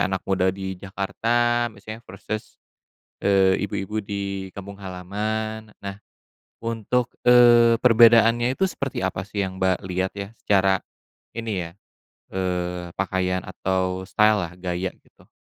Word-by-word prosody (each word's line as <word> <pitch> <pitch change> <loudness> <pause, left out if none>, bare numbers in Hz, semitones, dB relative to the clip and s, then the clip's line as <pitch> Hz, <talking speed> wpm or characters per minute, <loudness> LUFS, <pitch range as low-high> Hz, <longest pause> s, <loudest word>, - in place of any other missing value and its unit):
anak 95 0 -2
muda 95 -1 +2
di 95 -1 -5
Jakarta 120 +5 0
misalnya 110 +2 -9
versus, 110 0 -6 0.6
eee, 95 -1 +4
ibu-ibu 105 +3 -3
di 100 -1 -4
kampung 100 0 -8
halaman, 105 +4 -4
nah 100 0 -6 0.7
untuk, 115 +2 -1 0.2
eee, 120 -1 +7
perbedaannya 115 +1 +6
itu 190 - +2
seperti 140 - -3
apa 95 +1 -3
sih 100 0 -1
yang 95 0 -6
Mbak 95 -1 +2
lihat 95 +1 -1
ya? 100 +2 -6
Secara 95 -1 +3 0.6
ini 110 -6 -2
ya, - - -16 0.6
eee, 90 -2 -2
pakaian 95 -1 -1
atau 95 0 -2
style 105 -1 +4
lah, 85 - -14
gaya, 90 +1 -2 0.2
gitu. - - -24
100 Hz, 130 wpm, -24 LUFS, 95-110 Hz, 0.7 s, eee